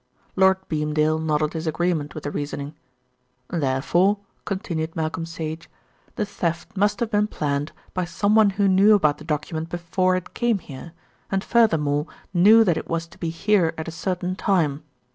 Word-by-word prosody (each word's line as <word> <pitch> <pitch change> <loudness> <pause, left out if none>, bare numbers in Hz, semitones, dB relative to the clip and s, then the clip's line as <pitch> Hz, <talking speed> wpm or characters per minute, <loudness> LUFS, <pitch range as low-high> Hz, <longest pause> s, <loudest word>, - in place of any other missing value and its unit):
Lord 190 0 +5
Beamdale 155 0 +1
nodded 155 -1 0
his 160 0 -4
agreement 160 -2 -1
with 155 - -6
the 145 - -3
reasoning. 145 0 -4 0.8
"Therefore," 170 +6 +1 0.3
continued 170 -5 -3
Malcolm 160 +1 -2
Sage, 160 0 -6 0.5
"the 210 - -1
theft 170 -4 -3
must 205 +4 +1
have 235 - -1
been 210 0 +2
planned 145 -5 -2 0.2
by 180 -1 -1
someone 205 +5 +3
who 200 0 +1
knew 195 +3 +6
about 155 -7 +2
the - - -10
document 160 +1 -3
before 185 +2 0
it 185 - -5
came 240 -3 +1
here, 160 -1 -10 0.4
and 195 0 0
furthermore 155 - +2 0.3
knew 210 +6 +7
that 175 -6 +2
it - - -6
was 165 0 -1
to 170 - -18
be 165 - -2
here 170 -1 +1
at 160 - -5
a - - -4
certain 180 +2 -3
time. 160 -8 +1
170 Hz, 165 wpm, -23 LUFS, 155-195 Hz, 0.8 s, knew